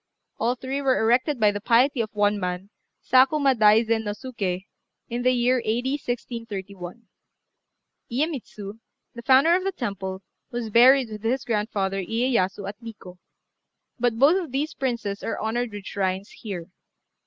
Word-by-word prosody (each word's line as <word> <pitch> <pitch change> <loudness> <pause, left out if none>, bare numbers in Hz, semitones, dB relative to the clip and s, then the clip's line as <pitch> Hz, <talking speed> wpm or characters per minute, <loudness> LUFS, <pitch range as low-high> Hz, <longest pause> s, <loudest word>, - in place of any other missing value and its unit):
All 240 +2 +1
three 265 +2 -4
were 265 -2 +2
erected 245 +5 +2
by 210 -2 +4
the 205 0 -5
piety 245 +4 +3
of 220 - -3
one 205 0 +2
man, 180 +2 -4 0.3
Sakuma 270 +2 +4
Daizen 220 0 +4
no 205 - -2
Suké, 200 -6 -4 0.4
in 240 +1 -3
the 255 - +3
year 250 +1 +2
A.D. 240 +4 -1
1631. 220 -4 -6 1.0
Iyémitsu, 235 -7 -4 0.3
the 235 - -8
founder 270 +7 +5
of 370 - 0
the 390 - 0
temple, 195 - -5 0.3
was 240 -2 -4
buried 250 +1 +6
with 210 -1 -7
his 240 +4 -1
grandfather, 205 -3 -1
Iyéyasu, 225 -3 0
at 205 +4 -8
Nikkô; 210 -6 -11 0.8
but 240 -1 +1
both 305 +10 +5
of 315 - -10
these 290 +4 -2
princes 235 -6 -3
are - - -3
honoured 230 +2 -2
with 205 -1 -8
shrines 190 0 -2
here. 185 -6 -7
230 Hz, 150 wpm, -24 LUFS, 205-255 Hz, 1.0 s, buried